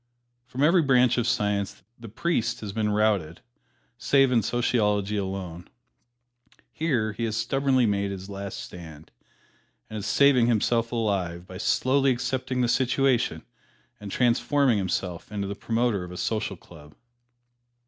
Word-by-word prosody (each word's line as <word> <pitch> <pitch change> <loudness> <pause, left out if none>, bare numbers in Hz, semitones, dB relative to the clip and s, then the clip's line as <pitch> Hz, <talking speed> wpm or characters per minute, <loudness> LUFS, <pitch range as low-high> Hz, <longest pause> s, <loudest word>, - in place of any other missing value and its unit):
From 130 +2 -2
every 170 +3 +5
branch 125 -4 +3
of 120 - 0
Science 100 -1 -1
the 115 -2 -11
priest 120 -1 -1
has 105 -2 -6
been 110 -1 0
routed, 105 -6 0 0.6
save 135 0 +3
in 120 -2 +3
Sociology 105 -3 0
alone. 95 -3 -5 1.0
Here 125 -9 0
he 115 +2 -3
has 110 -1 -2
stubbornly 130 +2 +1
made 100 -2 0
his 95 -1 -7
last 100 -1 -6
stand, 80 -3 -10 0.8
and 110 - -4
is 100 - -5
saving 135 -4 +4
himself 115 0 +1
alive 95 -7 -2
by 95 0 -10
slowly 135 +5 +2
accepting 130 0 -1
the 120 - +2
situation 125 -8 +1 0.6
and 105 -2 -8
transforming 125 0 +2
himself 95 -1 -3
into 100 -1 -3
the 100 - -3
Promoter 115 -1 -1
of 90 - -9
a 90 - -8
Social 105 -2 -2
Club. 75 -3 -16
110 Hz, 140 wpm, -26 LUFS, 100-125 Hz, 1.0 s, every